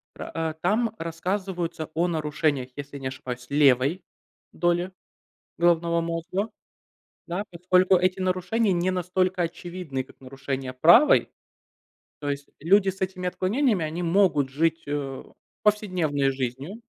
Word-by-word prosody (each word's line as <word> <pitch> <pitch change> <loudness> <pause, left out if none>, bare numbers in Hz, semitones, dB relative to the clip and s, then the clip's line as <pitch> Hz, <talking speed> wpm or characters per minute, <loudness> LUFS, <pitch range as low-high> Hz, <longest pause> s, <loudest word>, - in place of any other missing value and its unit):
Про, - - -7
э, 160 -1 -2
там 220 +4 +1
рассказываются 175 -1 -3
о 170 +3 +1
нарушениях, 150 -5 -1
если 145 0 -7
не 135 - -4
ошибаюсь, 125 -1 -6
левой 140 +4 +3 0.5
доли 175 +1 0 0.7
головного 170 0 +3
мозга. 170 +5 -2 0.8
Да? 180 +4 -3
Поскольку 180 +2 +3
эти 185 +1 +1
нарушения 185 +4 +1
не 175 +1 +1
настолько 185 0 0
очевидны, 170 -4 -4
как - - -20
нарушения 135 0 -5
правой. 170 - +6 0.9
То 145 - -3
есть 140 0 -4
люди 190 +5 +4
с 190 +1 -7
этими 185 -1 -2
отклонениями- 200 - +1
они 165 +3 -4
могут 170 -6 +3
жить, 165 +4 0
э, 140 -2 -3 0.4
повседневной 180 -10 +1
жизнью, 135 - -5
170 Hz, 125 wpm, -25 LUFS, 145-185 Hz, 0.9 s, правой